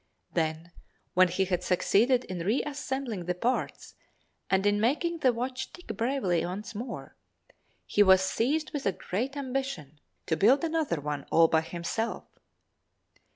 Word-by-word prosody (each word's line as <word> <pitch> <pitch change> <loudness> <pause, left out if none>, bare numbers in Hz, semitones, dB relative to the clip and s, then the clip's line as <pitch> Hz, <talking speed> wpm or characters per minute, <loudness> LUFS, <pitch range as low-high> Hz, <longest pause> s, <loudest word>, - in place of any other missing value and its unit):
Then, 160 0 -1 0.4
when 185 0 +6
he 185 +2 0
had 180 -1 -1
succeeded 235 +8 +3
in 185 -5 -6
reassembling 260 - -2
the 180 +1 -1
parts 240 +8 -2 0.6
and 190 +1 +2
in 205 0 +3
making 330 +8 +1
the 260 -4 +4
watch 255 +2 -4
tick 355 - -8
bravely 230 -8 0
once 195 +6 -5
more, 235 +3 -7 0.7
he 205 - +2
was 190 -2 +7
seized 285 +11 0
with 290 -7 -2
a 195 - +2
great 250 +12 -3
ambition 260 - -4 0.3
to 160 - +1
build 245 - +4
another 320 - 0
one 145 -1 -4
all 165 0 +6
by 160 0 +3
himself. 175 +7 -3
210 Hz, 145 wpm, -29 LUFS, 180-265 Hz, 0.7 s, was